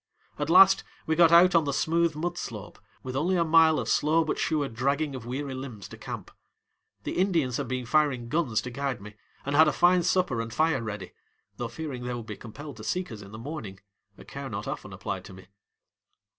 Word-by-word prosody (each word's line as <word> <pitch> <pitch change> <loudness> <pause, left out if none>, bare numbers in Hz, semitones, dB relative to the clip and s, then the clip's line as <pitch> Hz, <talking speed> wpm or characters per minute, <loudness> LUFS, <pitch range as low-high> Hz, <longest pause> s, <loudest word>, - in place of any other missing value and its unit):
At 145 +1 -2
last 190 +2 +7 0.2
we 160 - +1
got 165 0 +6
out 175 +2 +7
on 165 -2 +4
the 140 - 0
smooth 165 +2 +1
mud 175 +3 -2
slope 110 - -7 0.2
with 130 0 -5
only 170 +7 +1
a 170 - +3
mile 160 -1 +5
of - - -3
slow 160 +2 +3
but - - -2
sure 150 -3 0
dragging 140 +5 -1
of 125 -3 -7
weary 135 +2 -4
limbs 130 -6 -7
to - - -9
camp. - - -7 0.7
The - - -3
Indians 165 -10 +1
had 140 - -3
been 130 0 -3
firing 140 -3 +1
guns 130 -5 0
to 125 - -7
guide 140 +1 -3
me 105 +1 -11 0.3
and 140 +1 -1
had 160 +1 +7
a - - +3
fine 175 +5 +4
supper 170 -9 +1
and 115 0 -6
fire 155 +1 +1
ready, 105 -4 -6 0.4
though 120 - -3
fearing 130 +1 -6
they 125 0 -3
would 120 -2 -6
be 105 - -6
compelled 140 +5 -10
to 110 - -9
seek 180 +8 -2
us 110 -2 -8
in 100 0 -12
the 110 - -8
morning, 115 -7 -7 0.4
a - - -13
care 140 -1 -7
not 105 -1 -5
often 95 - -5
applied 95 0 -5
to - - -11
me. 95 0 -14
140 Hz, 220 wpm, -27 LUFS, 115-160 Hz, 0.7 s, last